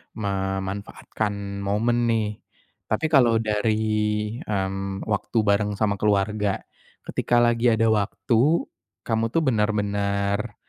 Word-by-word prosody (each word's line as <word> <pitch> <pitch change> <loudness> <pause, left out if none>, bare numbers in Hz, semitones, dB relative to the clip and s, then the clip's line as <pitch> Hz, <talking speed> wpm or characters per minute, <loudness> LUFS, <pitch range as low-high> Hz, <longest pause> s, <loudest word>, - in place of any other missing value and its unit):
memanfaatkan 100 0 -3
momen, 115 +4 +1
nih. 110 -2 0 0.5
Tapi 110 +8 0
kalau 125 -6 +5
dari, 110 0 +1 0.6
mmm, 95 -1 -3
waktu 110 +2 -2
bareng 105 0 +1
sama 100 -1 0
keluarga, 105 0 0 0.4
ketika 120 0 +1
lagi 120 0 +2
ada 115 -1 +3
waktu, 110 - +2 0.4
kamu 115 -1 0
tuh 160 +8 0
benar-benar, 105 -2 0
105 Hz, 100 wpm, -24 LUFS, 100-115 Hz, 0.6 s, kalau